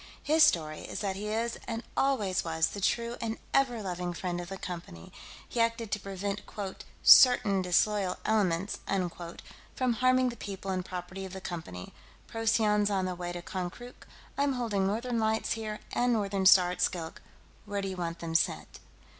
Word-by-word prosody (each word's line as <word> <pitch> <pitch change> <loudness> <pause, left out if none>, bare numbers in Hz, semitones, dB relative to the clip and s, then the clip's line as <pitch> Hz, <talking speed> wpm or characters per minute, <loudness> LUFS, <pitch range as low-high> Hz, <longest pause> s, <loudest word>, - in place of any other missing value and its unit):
"His 315 +2 +3
story 160 - +4
is - - -6
that 195 -2 -1
he 205 +2 -5
is 230 +2 -2
and 230 +1 -3
always 210 -9 +1
was 160 -1 +1
the 200 - -7
true 235 +4 0
and 225 -1 -2 0.2
ever 245 -5 +2
loving 180 -2 -3
friend 175 0 -3
of 175 - -8
the 195 - -5
Company; 170 - -8 0.3
he 235 - -1
acted 230 -2 0
to 210 - 0
prevent 200 +1 -4
quote 200 -2 -6 0.2
certain 220 -6 +7
disloyal 185 +1 +1
elements 195 -3 +1
unquote 175 -3 -3 0.3
from 255 -2 +1
harming 255 +2 +3
the 240 - -7
people 195 -3 -6
and 185 -1 -1
property 185 +1 -6
of 190 -1 -7
the 190 - -5
Company. 160 - -7 0.3
Procyon's 215 -2 +2
on 190 -2 0
the 185 - -2
way 175 0 -5
to 175 0 -6
Konkrook. 190 +8 -7 0.3
I'm 280 -1 +2
holding 215 -6 0
Northern 230 +4 -1
Lights 220 0 0
here 215 -2 -3
and 245 0 +2
Northern 200 -4 +1
Star 185 -2 +7
at 180 - -5
Skilk; 165 -3 -2 0.4
where 200 -1 -3
do - - -2
you 190 -1 -5
want 170 -1 -3
them 165 -1 -5
sent?" 75 - 0
195 Hz, 180 wpm, -30 LUFS, 180-225 Hz, 0.4 s, certain